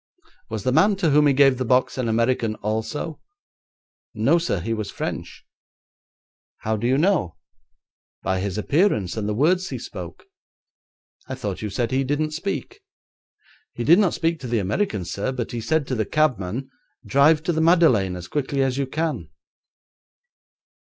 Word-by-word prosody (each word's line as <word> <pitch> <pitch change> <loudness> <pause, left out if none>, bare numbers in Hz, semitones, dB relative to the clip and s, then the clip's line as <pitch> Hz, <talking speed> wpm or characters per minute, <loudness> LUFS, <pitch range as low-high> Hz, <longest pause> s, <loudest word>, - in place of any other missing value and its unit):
'Was 110 -2 -4
the 130 - +1
man 195 +9 +4
to 175 -5 +1
whom 150 +1 +5
he 140 - +4
gave 135 -2 +4
the - - 0
box 125 +1 +2
an 130 -2 -2
American 115 -1 +1
also?' 110 +10 -4 0.9
'No, 135 +11 +3
sir, 130 - -1
he 115 +7 -2
was 110 -2 -4
French.' - - -6 1.2
'How 110 0 -1
do 110 +3 -2
you 130 +2 +3
know?' 160 - +1 0.9
'By 95 -1 0
his 95 0 -3
appearance 110 - +1
and 105 -1 -2
the 105 - -1
words 180 - +2
he - - -4
spoke.' - - -9 1.0
'I 130 - -4
thought 105 -7 -5
you 105 - -3
said 115 +4 -2
he 135 +1 +1
didn't 145 +3 -1
speak.' 200 - -4 0.9
'He 120 - -4
did 170 - +6
not 195 -4 +2
speak 165 0 0
to 130 - -7
the 120 -1 0
American, 105 - -1
sir, 100 +8 -3
but 125 -2 -4
he 120 -2 -4
said 160 +4 0
to 135 - -4
the 110 -3 0
cabman, 130 -3 0 0.3
"Drive 150 +3 +4
to 175 - 0
the 160 - 0
Madeleine 160 - +4
as 90 0 -8
quickly 140 -1 -1
as 135 0 -1
you 135 - -1
can."' 155 +3 -3
130 Hz, 170 wpm, -23 LUFS, 110-155 Hz, 1.2 s, did